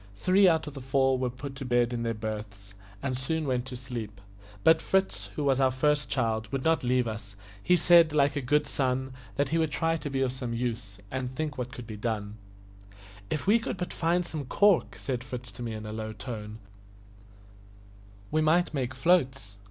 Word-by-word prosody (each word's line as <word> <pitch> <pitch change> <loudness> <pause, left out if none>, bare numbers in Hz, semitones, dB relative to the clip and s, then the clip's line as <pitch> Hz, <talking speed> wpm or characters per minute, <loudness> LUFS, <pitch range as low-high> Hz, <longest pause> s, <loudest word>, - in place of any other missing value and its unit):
Three 185 - +4
out 160 -2 +3
of 150 - -7
the 135 - -7
four 130 0 +2
were 130 -1 -1
put 135 +3 -7
to 135 - -5
bed 120 -1 +2
in 120 - -2
their 115 -1 -1
berths, 105 -2 -6 0.3
and 135 -2 -1
soon 155 +5 -2
went 130 -2 -1
to 125 - -6
sleep; 115 -5 -6 0.4
but 160 0 +6
Fritz, 190 - 0
who 150 - -2
was 135 -2 +2
our 135 -1 +4
first 145 +1 +1
child, 110 -4 -1
would 135 -1 -2
not 160 -3 +2
leave 125 -1 +2
us. 105 -2 -6 0.3
He 180 - +4
said, 170 -2 +6
like 145 -1 +3
a 145 - -1
good 150 +4 +2
son, 130 -1 -1 0.2
that 140 -1 +1
he 165 +3 +1
would 160 -1 +2
try 165 +3 0
to 150 - -5
be 135 -1 -1
of 130 -2 +1
some 125 -2 -4
use, 115 -4 -3
and 130 -1 -3
think 155 -1 -2
what 125 -1 -4
could 120 0 -8
be 110 -1 -7
done. 105 -1 -3 0.9
"If 150 - -2
we 215 +4 +5
could 225 - -4
but 180 0 -4
find 175 +1 +1
some 155 -4 -4
cork," 200 +6 +3
said 125 -3 -3
Fritz 125 -2 -7
to 100 - -11
me 115 -2 -3
in 110 0 -7
a 105 - -5
low 110 0 -4
tone, 105 0 -7 1.7
"we 155 - +2
might 165 +3 +3
make 130 -2 -2
floats. 130 - +1
130 Hz, 205 wpm, -28 LUFS, 115-150 Hz, 1.7 s, but